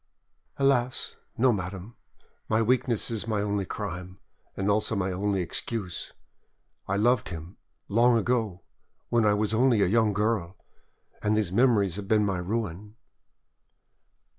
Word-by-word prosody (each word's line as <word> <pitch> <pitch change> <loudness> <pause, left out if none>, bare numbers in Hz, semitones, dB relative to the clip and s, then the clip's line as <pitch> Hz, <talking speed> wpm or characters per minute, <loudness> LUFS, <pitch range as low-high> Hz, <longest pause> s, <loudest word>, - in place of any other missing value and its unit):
"Alas! 130 -3 +1 0.2
no, 125 +1 +4
madame; 95 +3 -5 0.5
my 110 - +3
weakness 120 0 +1
is 115 -1 -3
my 110 -2 0
only 100 -1 -1
crime, 90 -2 -6 0.4
and 95 - -1
also 105 +2 +1
my 95 -1 0
only 100 +1 0
excuse. 90 +1 -4 0.8
I 100 - 0
loved 120 +2 +2
him, 85 +1 -8 0.3
long 120 +3 +4
ago, 110 -5 -1 0.5
when 115 -2 +3
I 105 - +4
was 105 +1 0
only 120 0 +4
a - - +4
young 110 +2 +3
girl, 105 -4 -1 0.6
and 105 +1 +1
these 105 -5 0
memories 105 -5 +3
have 100 -1 -6
been 105 0 +3
my 95 -3 -1
ruin." 105 +1 -4
105 Hz, 140 wpm, -27 LUFS, 95-115 Hz, 0.8 s, no